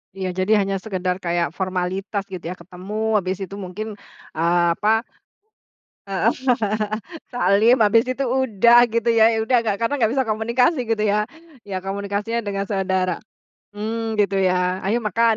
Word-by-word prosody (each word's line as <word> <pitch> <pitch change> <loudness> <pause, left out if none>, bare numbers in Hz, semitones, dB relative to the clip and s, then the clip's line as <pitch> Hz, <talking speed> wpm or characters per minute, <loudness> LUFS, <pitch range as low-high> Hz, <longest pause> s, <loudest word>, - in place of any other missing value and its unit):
Iya 190 -1 -3
jadi 185 +3 0
hanya 195 0 -2
sekedar 185 -3 -2
kayak 170 -1 -1
formalitas, 190 +2 -2
gitu 185 -2 -6
ya. 180 - -4
Ketemu 185 +3 -9 0.2
habis 185 0 -3
itu 195 +1 -7
mungkin, 195 +3 -6 0.5
eee, 170 +1 +2
apa 220 +4 +2 1.1
heeh. 195 +4 +1 1.0
Salim, 220 +1 +4
asbis 225 +3 +4
itu 275 - -2
udah, 240 -2 +4
gitu 230 +1 -1
ya 225 -1 +5
ya 225 - 0
udah 250 +3 +2
nggak 210 -3 -1
karena 230 +5 0
nggak 225 -1 +3
bisa 265 0 +1
komunikasi, 235 +7 +1
gitu 225 -2 0
ya. 210 +1 +1 0.4
Ya 195 - -3
komunikasinya 200 +3 -2
dengan 200 -2 -3
saudara 190 -2 0 0.6
mmm, 225 +1 -3
gitu 200 -2 +1
ya, 185 0 +1
"ayo 235 +2 +1
makan". 225 +2 +2
205 Hz, 150 wpm, -22 LUFS, 185-225 Hz, 1.1 s, ya